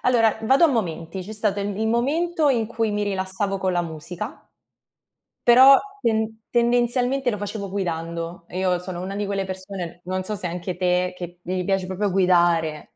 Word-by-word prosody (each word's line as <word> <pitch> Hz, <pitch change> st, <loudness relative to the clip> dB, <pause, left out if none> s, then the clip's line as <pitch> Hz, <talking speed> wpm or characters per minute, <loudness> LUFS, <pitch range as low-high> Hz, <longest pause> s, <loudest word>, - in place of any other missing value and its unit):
allora 225 Hz, -3 st, +3 dB
vado 270 Hz, +8 st, +5 dB
a -, -, +8 dB
momenti, 190 Hz, -, -2 dB
c'è 210 Hz, +4 st, -8 dB
stato 210 Hz, -2 st, 0 dB
il, 200 Hz, 0 st, -3 dB
il 220 Hz, -, 0 dB
momento 300 Hz, +7 st, +1 dB
in 235 Hz, -5 st, +2 dB
cui 225 Hz, -1 st, -1 dB
mi 210 Hz, 0 st, -1 dB
rilassavo 195 Hz, 0 st, -2 dB
con 190 Hz, -1 st, 0 dB
la 175 Hz, -1 st, +1 dB
musica, 165 Hz, +1 st, -7 dB, 0.9 s
però 260 Hz, +3 st, +8 dB, 0.2 s
tend 220 Hz, -1 st, 0 dB
tendenzialmente 245 Hz, +2 st, +2 dB
lo 210 Hz, -, -3 dB
facevo 200 Hz, -1 st, -5 dB
guidando. 170 Hz, -2 st, -4 dB
Io 185 Hz, 0 st, 0 dB
sono 180 Hz, -1 st, -6 dB
una 195 Hz, +2 st, -5 dB
di 205 Hz, 0 st, -2 dB
quelle 195 Hz, -1 st, -2 dB
persone, 185 Hz, -2 st, -6 dB
non 185 Hz, +1 st, -3 dB
so 210 Hz, -, -2 dB
se 185 Hz, -3 st, -2 dB
anche 175 Hz, +1 st, -4 dB
te, 180 Hz, 0 st, +1 dB
che 175 Hz, -1 st, -8 dB
gli 180 Hz, +1 st, -2 dB
piace 195 Hz, 0 st, 0 dB
proprio 190 Hz, +1 st, -1 dB
guidare, 170 Hz, -4 st, +2 dB
195 Hz, 175 wpm, -23 LUFS, 180-225 Hz, 0.9 s, a